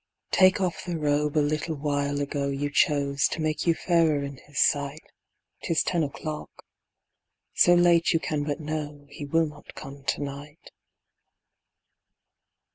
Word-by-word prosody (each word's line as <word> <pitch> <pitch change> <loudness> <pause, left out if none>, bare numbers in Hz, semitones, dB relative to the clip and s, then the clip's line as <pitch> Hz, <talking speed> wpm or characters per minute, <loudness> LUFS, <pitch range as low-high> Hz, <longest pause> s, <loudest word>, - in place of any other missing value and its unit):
Take 185 0 +5
off 180 -4 -2
the 175 -2 -3
robe 150 0 0
a 150 - +3
little 155 +2 -2
while 145 0 -1
ago 140 0 -2
You 140 +1 -2
chose, 140 -3 +2
to - - -5
make 155 +1 -1
you 165 - +4
fairer 160 -5 +2
in 140 -1 -6
his 145 +1 -14
sight; 145 +2 +1 0.6
'Tis 165 - +1
ten 175 -2 0
o'clock. 150 +1 -5 1.0
So 175 - +5
late 175 -1 +4
you 165 - +2
can 150 -2 -2
but 145 -1 -3
know 150 -2 -5
He 145 0 -7
will 165 +3 +2
not 150 -1 -11
come 135 0 -10
to 145 - -1
night. 145 +2 -9
150 Hz, 150 wpm, -26 LUFS, 145-160 Hz, 1.0 s, Take